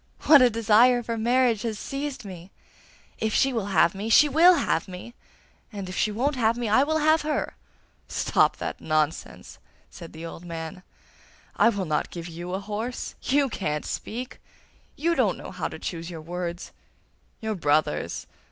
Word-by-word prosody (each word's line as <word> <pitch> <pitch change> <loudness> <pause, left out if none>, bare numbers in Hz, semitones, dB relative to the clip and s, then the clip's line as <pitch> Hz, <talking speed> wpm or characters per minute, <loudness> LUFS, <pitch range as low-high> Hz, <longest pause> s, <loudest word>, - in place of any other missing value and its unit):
What 295 -3 +8
a 250 - +6
desire 230 +2 +4
for 230 0 -3
marriage 235 -1 +2
has 225 -3 -3
seized 275 -2 -5
me! 180 -2 -9 0.7
If 220 -1 -1
she 270 0 +3
will 220 -4 -2
have 170 -3 +3
me, 200 +3 -5
she 295 +6 +7
WILL 335 +5 +6
have 170 - 0
me, 185 +6 -9 0.6
and 200 -3 -6
if 185 - -6
she 215 - +1
won't 265 +7 0
have 230 -2 +1
me, 240 -1 -2
I 220 +5 +4
will 315 +3 +1
have 315 +1 +3
her.' 300 0 -2 0.5
'Stop - - +1
that - - -5
nonsense!' 155 0 -2 0.3
said 170 -2 -11
the 160 +1 -8
old 165 +1 -9
man. 165 +1 -7 0.8
'I - - +5
will 200 -4 -2
not 155 -2 -1
give 170 -1 -7
you 175 +2 -6
a - - -2
horse. 215 +5 -5
YOU 280 +1 +2
can't 150 - -3
speak; 245 +3 -6 0.5
YOU 335 +3 +1
don't - - +1
know - - -9
how - - -3
to - - -8
choose 170 -1 -5
your 165 -3 -7
words. 175 +1 -5 0.7
Your 220 -1 -2
brothers! 150 - 0
215 Hz, 175 wpm, -25 LUFS, 175-250 Hz, 0.8 s, What